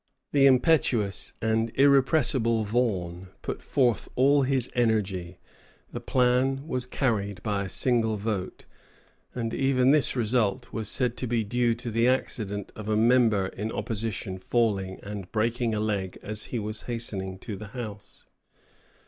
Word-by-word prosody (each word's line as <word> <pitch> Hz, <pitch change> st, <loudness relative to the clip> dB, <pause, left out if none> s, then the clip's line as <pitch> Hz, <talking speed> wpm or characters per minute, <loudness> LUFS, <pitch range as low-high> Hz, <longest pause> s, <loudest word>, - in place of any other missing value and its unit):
The 140 Hz, -1 st, +5 dB
impetuous 130 Hz, -, +2 dB
and 110 Hz, +1 st, +1 dB
irrepressible 135 Hz, -4 st, +3 dB
Vaughan 95 Hz, -6 st, -1 dB, 0.2 s
put -, -, -4 dB
forth 125 Hz, -5 st, +1 dB
all 140 Hz, +3 st, +4 dB
his 130 Hz, -2 st, +1 dB
energy; 100 Hz, -7 st, 0 dB, 0.5 s
the -, -, -5 dB
plan 130 Hz, +3 st, +1 dB
was 125 Hz, -4 st, -1 dB
carried 105 Hz, -7 st, -1 dB
by 100 Hz, -2 st, -1 dB
a -, -, -6 dB
single 115 Hz, -2 st, +1 dB
vote. 100 Hz, -3 st, -4 dB, 0.7 s
And 115 Hz, -2 st, -3 dB
even 135 Hz, -1 st, +3 dB
this 150 Hz, -2 st, +3 dB
result 115 Hz, -4 st, 0 dB
was 110 Hz, -2 st, -3 dB
said 125 Hz, -2 st, 0 dB
to 125 Hz, -, -3 dB
be 115 Hz, -1 st, 0 dB
due 120 Hz, +2 st, +1 dB
to 120 Hz, 0 st, -6 dB
the 115 Hz, +2 st, +2 dB
accident 105 Hz, -6 st, -2 dB
of 110 Hz, 0 st, -7 dB
a 105 Hz, -, +2 dB
member 115 Hz, -3 st, +4 dB
in 110 Hz, +2 st, -5 dB
opposition 105 Hz, -4 st, -3 dB
falling 95 Hz, -3 st, 0 dB
and 100 Hz, -3 st, -7 dB
breaking 115 Hz, +1 st, 0 dB
a -, -, -1 dB
leg 100 Hz, -4 st, -2 dB
as 110 Hz, 0 st, -2 dB
he 125 Hz, -, -4 dB
was 110 Hz, 0 st, -3 dB
hastening 100 Hz, -5 st, -1 dB
to 100 Hz, +2 st, -7 dB
the 105 Hz, +2 st, -8 dB
House. 105 Hz, -4 st, -8 dB
115 Hz, 150 wpm, -27 LUFS, 105-125 Hz, 0.7 s, The